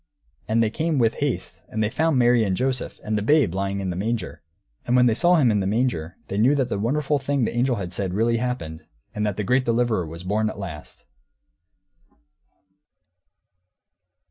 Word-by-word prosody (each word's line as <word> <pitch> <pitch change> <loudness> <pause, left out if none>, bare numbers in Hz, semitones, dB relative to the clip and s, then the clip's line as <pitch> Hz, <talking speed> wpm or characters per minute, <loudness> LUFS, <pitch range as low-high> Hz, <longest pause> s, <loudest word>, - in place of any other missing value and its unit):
And 115 +1 +2
they 110 - 0
came, 160 +3 -1
with 115 -3 +3
haste, 145 -3 -3
and 110 0 -1
they 105 - +1
found 160 0 +1
Mary, 120 -1 +4
and 95 -3 0
Joseph, 130 0 -2
and 110 - -2
the 105 - 0
babe 130 - +3
lying 100 +1 -2
in 95 -2 -2
a - - -7
manger. 105 -1 -3 0.5
And 125 - +2
when 125 0 +5
they 120 - +4
saw 175 +9 +4
Him 135 -8 +4
in 105 - +1
the 95 - -1
manger, 100 -7 -1
they 100 - -3
knew 130 +7 +4
that 130 -3 0
the 100 - -2
wonderful 145 +6 0
thing 135 -2 0
the - - -3
angel 125 0 +1
said 90 - -3
had 90 - -4
really 115 +2 +2
happened, 115 -11 -4 0.3
and 105 - -2
that 100 - -3
the 105 - -1
great 125 +6 +2
deliverer 115 -7 0
was 85 +2 -9
born 105 +3 0
at - - -8
last. 90 -7 -9
115 Hz, 195 wpm, -23 LUFS, 100-130 Hz, 0.5 s, when